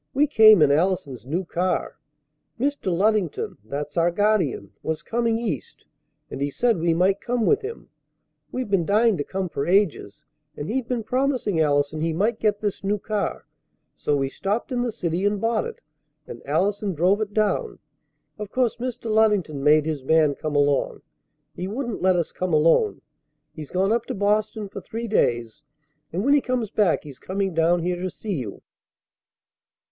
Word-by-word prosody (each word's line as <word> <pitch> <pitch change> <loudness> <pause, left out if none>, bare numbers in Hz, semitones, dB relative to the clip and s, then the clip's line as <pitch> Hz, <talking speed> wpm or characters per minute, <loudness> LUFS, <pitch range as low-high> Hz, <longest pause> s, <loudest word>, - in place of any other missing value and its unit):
"We 290 +2 +4
came 215 - +7
in 145 - +4
Allison's 145 -6 0
new 175 +6 -2
car. 180 +2 -2 0.6
Mr. 280 -7 -1
Luddington 195 -1 0
that's 145 +8 -5
our 170 +1 +4
guardian 180 - 0
was 160 -1 -3
coming 230 -1 0
East, 210 - -5 0.5
and 135 - -6
he 140 - 0
said 230 - +1
we 170 +1 +2
might 185 +4 +2
come 240 -2 -1
with 430 - +3
him. 435 +2 -7 0.6
We've 255 -2 -3
been 190 -4 +3
dying 215 +4 +3
to 145 - -1
come 190 +4 -3
for 140 -4 -3
ages. 180 - +1 0.3
And 145 - -5
he'd 250 +1 -2
been 245 -3 -2
promising 250 - 0
Allison 145 0 +1
he 165 0 0
might 215 +7 0
get 210 -1 +1
this 205 -2 -3
new 205 +2 0
car; 210 0 -3 0.5
so 145 - -1
we 135 -1 0
stopped 200 - -3
in 245 -1 0
the 245 -1 -1
city 175 -2 -2
and 205 0 +1
bought 225 0 0
it, - - -10 0.4
and 120 - -9
Allison 195 +5 0
drove 185 +7 +2
it 210 -1 -2
down. 215 - 0 0.6
Of 210 -2 -5
course 250 0 0
Mr. 245 0 -5
Luddington 210 -10 +2
made 150 +1 +5
his 155 -4 -3
man 155 0 +3
come 150 +1 -4
along. 145 -1 +1 0.5
He 180 +4 -5
wouldn't 240 +2 -4
let 185 0 +4
us 170 -2 -1
come 185 -2 -3
alone. 165 - +3 0.5
He's 155 -2 -9
gone 190 +3 +1
up 235 0 -1
to - - -3
Boston 210 +1 0
for - - -8
three 230 +1 -5
days; 120 - 0 0.5
and, 185 +7 -2
when 280 - +4
he 290 - +4
comes 250 -5 -2
back, 205 -6 +2
he's 140 -4 -11
coming 195 0 -2
down 165 +1 +2
here 175 0 -2
to 185 - -2
see 205 +3 -5
you." 125 - -5
195 Hz, 180 wpm, -24 LUFS, 160-220 Hz, 0.6 s, came